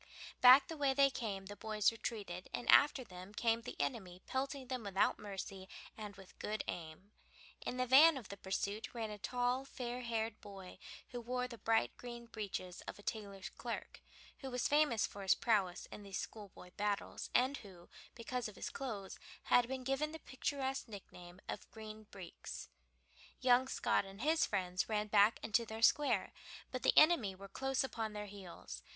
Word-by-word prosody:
Back 255 +2 +9
the 325 - -6
way 275 -2 +2
they 275 0 +6
came 205 -7 -4
the 205 +1 -7
boys 215 -1 +2
retreated, 205 -5 -5
and 240 - -6
after 285 -2 +6
them 185 -1 -11
came 230 0 +2
the - - -8
enemy 180 +5 -2
pelting 270 0 -2
them 255 -1 -3
without 200 -1 +2
mercy 195 -1 -6 0.3
and 210 -2 -7
with 195 -2 -15
good 215 +1 -2
aim. 170 +4 -6 0.5
In 250 - -3
the 255 - +2
van 285 +5 +8
of 235 -7 -8
the 200 - -5
pursuit 200 +4 -3
ran 225 -2 -3
a 210 - -7
tall, 245 +4 0
fair 250 -2 -5
haired 225 -2 -2
boy, 195 -3 -10 0.3
who 245 - -5
wore 250 +1 -1
the 235 -2 -10
bright 225 0 +2
green 240 -1 -8
breeches 200 -5 -5
of - - -5
a 205 - -14
tailor's 200 -3 -4
clerk, - - -6 0.4
who 270 - -5
was 250 -1 0
famous 290 -7 +4
for 200 - -8
his 190 - +4
prowess 200 -6 +1
in - - -8
these 195 -1 -5
schoolboy 200 -4 -8
battles, 205 -1 -2
and 260 +3 +4
who, 185 -4 -13 0.3
because 245 +1 -3
of 210 - -10
his - - -5
clothes, 215 -8 -5 0.2
had 245 -1 +4
been 260 0 -4
given 270 +4 0
the - - -5
picturesque 270 0 -2
nickname 180 -4 -11
of - - -5
"Green 215 -1 -9
Breeks." 185 -3 -8 0.7
Young 255 0 +5
Scott 265 - +1
and 195 +2 -10
his 315 +4 +3
friends 180 +1 -1
ran 210 -1 +1
back 205 +1 +5
into 230 +2 +2
their 220 0 -6
square, 290 +4 +4 0.4
but 255 - -3
the - - +3
enemy 295 - +6
were 195 +1 -10
close 270 +7 0
upon 225 -5 -3
their 210 0 -4
heels. 180 - -9
220 Hz, 180 wpm, -37 LUFS, 195-255 Hz, 0.7 s, Back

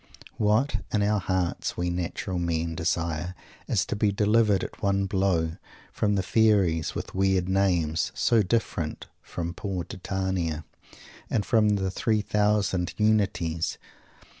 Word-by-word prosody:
What, 110 +6 +2
in 105 -1 +2
our 105 0 +2
hearts, 95 -2 -1
we 90 0 0
natural 90 +1 -3
men 85 -1 -1
desire 85 +1 -2 0.3
is 100 -6 +1
to - - -3
be 105 0 +2
delivered 105 -1 +3
at - - -7
one 100 0 +1
blow 95 -4 0 0.3
from 105 -1 +1
the 95 - +1
fairies 95 -7 +2
with - - -5
weird 95 -1 +2
names 90 -4 +1
(so 115 -2 +3
different 95 -6 -1 0.2
from 85 -1 -5
poor 95 -2 -3
Titania!), 90 -4 -3 0.6
and 105 -3 0
from 105 -2 +3
the 95 -2 -1
three 110 +2 +1
thousand 105 -5 +1
"Unities!" 100 -7 +1
95 Hz, 135 wpm, -26 LUFS, 85-105 Hz, 0.6 s, delivered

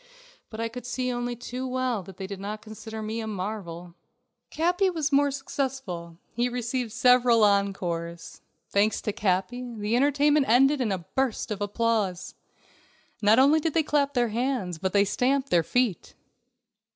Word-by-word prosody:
But 220 - -9
I 230 - 0
could 245 +1 -8
see 255 +1 -2
only 245 0 -3
too 250 +2 -5
well 255 -4 -1
that 185 0 -13
they 195 - -5
did 195 0 -7
not 210 +2 -6
consider 220 0 -8
me 220 +2 -3
a 220 - -4
marvel. 185 -4 -5 0.6
Capi 360 +4 +1
was 320 -4 -1
more 285 +1 +4
successful. 265 -11 -4 0.2
He 240 +1 0
received 245 -1 -3
several 245 -1 +4
encores. 180 -5 -1 0.3
Thanks 205 +2 +2
to 210 - -2
Capi, 200 +6 -1
the 210 +2 -1
entertainment 290 +2 +3
ended 270 +4 +4
in 225 -5 0
a 180 -3 -3
burst 260 -3 -1
of 205 -1 -4
applause. 205 -3 -1 0.9
Not 210 +1 +5
only 280 +4 +5
did 315 0 -2
they 325 - +4
clap 285 -1 +1
their 240 -2 +2
hands, 225 -7 -2
but 190 +1 -1
they 200 +1 +4
stamped 265 +6 0
their 170 - +5
feet. 235 +2 -1
230 Hz, 165 wpm, -26 LUFS, 200-260 Hz, 0.9 s, Not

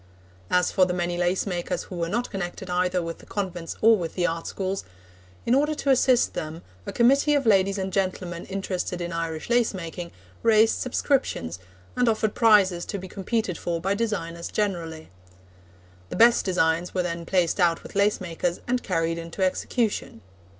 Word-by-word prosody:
As 180 -1 +2
for 185 - +4
the 180 - -2
many 175 0 -1
lace 175 +1 +1
makers 175 -3 -2
who 185 - -9
were 170 -1 -2
not 235 +6 -2
connected 185 -1 -5
either 180 0 +1
with 165 0 -6
the - - -15
convents 180 -5 -4
or 225 +1 +7
with 170 -5 -4
the 180 - +1
art 165 -1 -2
schools, 195 0 -3 0.6
in 235 - +2
order 295 +3 +2
to 280 -2 +1
assist 255 -1 +3
them, 160 +2 -5 0.2
a - - -2
committee 275 +5 +4
of 280 -2 +1
ladies 195 -2 +3
and 190 -1 -3
gentlemen 185 -3 -2
interested 190 -2 -3
in 175 0 -4
Irish 165 -2 -3
lace 235 -3 +2
making 170 -1 -6 0.3
raised 225 0 +5
subscriptions, 240 - -1 0.4
and 245 -1 +3
offered 215 -1 0
prizes 195 -6 +4
to 200 - -4
be 190 0 -7
competed 195 0 -2
for 170 -1 -2
by 195 +4 0
designers 170 -6 -3
generally. 170 - -3 1.0
The - - -5
best 235 +1 +5
designs 175 -2 +1
were 180 - +1
then 170 -1 -3
placed 180 +1 +1
out 170 -2 +2
with - - -11
lace 200 +1 +3
makers, 175 -1 -2
and 250 0 +1
carried 165 -3 -1
into 170 +3 -4
execution. 205 - -1
185 Hz, 180 wpm, -25 LUFS, 170-215 Hz, 1.0 s, or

